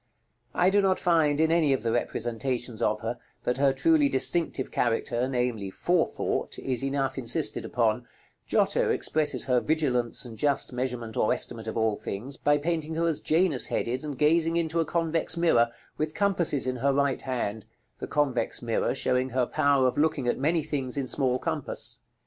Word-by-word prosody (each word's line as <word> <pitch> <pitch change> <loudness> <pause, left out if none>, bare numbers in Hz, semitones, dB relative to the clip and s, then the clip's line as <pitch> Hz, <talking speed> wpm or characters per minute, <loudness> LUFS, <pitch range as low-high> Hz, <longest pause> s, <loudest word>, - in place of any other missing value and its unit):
I 180 +2 +3
do 205 +1 +4
not 190 -1 +2
find, 155 -4 +2
in 160 0 +3
any 160 -4 +3
of 130 - -2
the 115 - 0
representations 120 0 -2
of 105 0 +1
her, 115 +2 -4 0.2
that 125 - 0
her 140 0 +3
truly 300 - +3
distinctive 165 - +1
character, 120 +1 0
namely, 120 -6 -1
forethought, 175 - -1
is 130 -1 -2
enough 135 -1 -1
insisted 135 +5 -1
upon: 120 0 0 0.4
Giotto - - +2
expresses 150 -2 +1
her 125 -1 +3
vigilance 130 -6 0
and 115 -3 -10
just 140 -3 0
measurement 125 -3 -3
or 110 - +2
estimate 115 -2 -2
of 110 - -4
all 110 -2 +1
things 120 +10 -4
by 145 0 +2
painting 160 +1 -2
her 170 +1 +1
as 160 -3 0
Janus 160 -4 +2
headed, 125 +4 -2
and 145 -3 -5
gazing 165 +3 +3
into 165 0 0
a 165 - +2
convex 165 +1 -1
mirror, 120 -9 +3 0.3
with 155 0 -2
compasses 175 -9 +1
in 130 0 -2
her 140 +3 +2
right 140 -1 +1
hand; 110 -5 -3 0.3
the - - -5
convex 135 -6 0
mirror 115 +2 0
showing 130 -1 +1
her 125 0 +1
power 140 0 +2
of 125 - -1
looking 150 -4 +1
at 120 - 0
many 160 +3 +1
things 140 -4 -3
in 140 - -1
small 130 -1 +1
compass. - - -3
135 Hz, 180 wpm, -27 LUFS, 120-160 Hz, 0.4 s, do